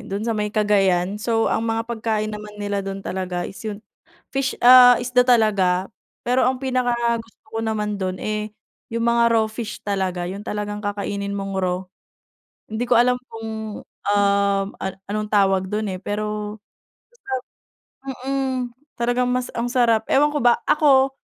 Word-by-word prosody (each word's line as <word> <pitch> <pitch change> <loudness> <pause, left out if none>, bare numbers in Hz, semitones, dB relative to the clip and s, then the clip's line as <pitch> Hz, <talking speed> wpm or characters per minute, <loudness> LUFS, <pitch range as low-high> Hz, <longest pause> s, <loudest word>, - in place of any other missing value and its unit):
do'n 200 +3 -3
sa 230 - 0
may 210 -1 -1
Cagayan. 205 -2 +1
So 225 0 +1
ang 225 +1 0
mga 225 0 0
pagkain 220 -2 -2
naman 210 0 -8
nila 205 -1 -2
dun 195 0 -6
talaga 180 -1 -3
is 195 - -8
'yung 210 0 -5 0.5
fish, 270 -1 -1
ah, 250 -1 +9
isda 250 0 +2
talaga. 200 -5 +3 0.3
Pero 250 +1 +3
ang 260 - 0
pinakagusto 240 -3 -1
ko 225 - -2
naman 210 -2 -2
do'n 185 0 -2
eh 215 0 -3 0.4
yung 230 0 -1
mga 235 0 +4
raw 220 -1 +3
fish 220 0 -6
talaga, 190 -3 -1
yung 195 +3 -6
talagang 210 -1 -4
kakainin 200 0 -3
mong 195 0 -4
raw. 180 -1 0 0.9
Hindi 230 +3 -1
ko 245 - +3
alam 250 +1 +4
kung, 220 -1 -6
um, 200 -1 +1
an 190 0 -3 0.2
anong 215 0 -2
tawag 195 -2 +3
dun 210 0 -2
eh, 185 - -5
pero 210 0 -3 0.6
masarap 265 - -5 0.8
Mm. 270 -1 0 0.4
Talagang 245 +1 +1
mas 250 0 0
ang 235 +1 -1
sarap. 230 -4 +3
Ewan 295 +2 +4
ko - - +2
ba 240 -1 +5
ako, 270 -3 +4
215 Hz, 160 wpm, -22 LUFS, 200-240 Hz, 0.9 s, ah